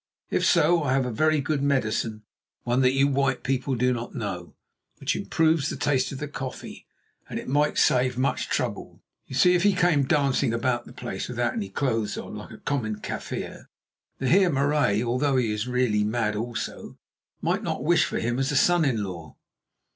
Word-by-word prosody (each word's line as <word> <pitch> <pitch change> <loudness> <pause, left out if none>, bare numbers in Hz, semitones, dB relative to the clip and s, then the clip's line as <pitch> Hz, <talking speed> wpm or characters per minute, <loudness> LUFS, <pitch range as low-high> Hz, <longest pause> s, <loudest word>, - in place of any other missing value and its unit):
If - - +1
so, 170 +2 +4
I 140 -3 0
have 135 -1 +2
a 125 - -2
very 155 +5 +2
good 145 0 -1
medicine, 115 -5 0 0.4
one 125 +2 +1
that 130 0 +4
you 135 +1 +3
white 140 -1 0
people 135 0 -1
do 125 +1 +2
not 120 +2 -6
know, 95 -8 -5 0.4
which - - -1
improves 160 -2 +1
the - - -4
taste 135 -3 0
of 135 - -5
the 150 +2 -4
coffee, 135 -3 -7 0.4
and - - -4
it - - -6
might 145 +3 +1
save 125 0 +3
much 130 +2 0
trouble. - - -3 0.2
You 130 - -7
see, 180 +7 +5
if 175 - +3
he 200 0 +3
came 170 -6 +3
dancing 135 -5 +1
about 120 +1 -1
the - - -11
place 125 -1 -5
without 120 -1 -1
any 100 -4 -4
clothes 115 -2 -1
on, - - -7
like - - -8
a - - -11
common 110 -8 -2
Kaffir, - - -6 0.5
the 130 - -2
Heer 185 +5 +5
Marais, 140 -7 +2
although 125 +4 +1
he 120 -4 +1
is 105 +2 -2
really 125 -4 +1
mad 110 0 0
also, 115 +2 -5 0.4
might - - 0
not - - -3
wish 165 +1 +4
for - - -3
him 120 +2 -1
as 135 +2 0
a - - -1
son 175 +2 +4
in 120 -8 +1
law." 85 -5 -8
130 Hz, 195 wpm, -25 LUFS, 115-145 Hz, 0.5 s, see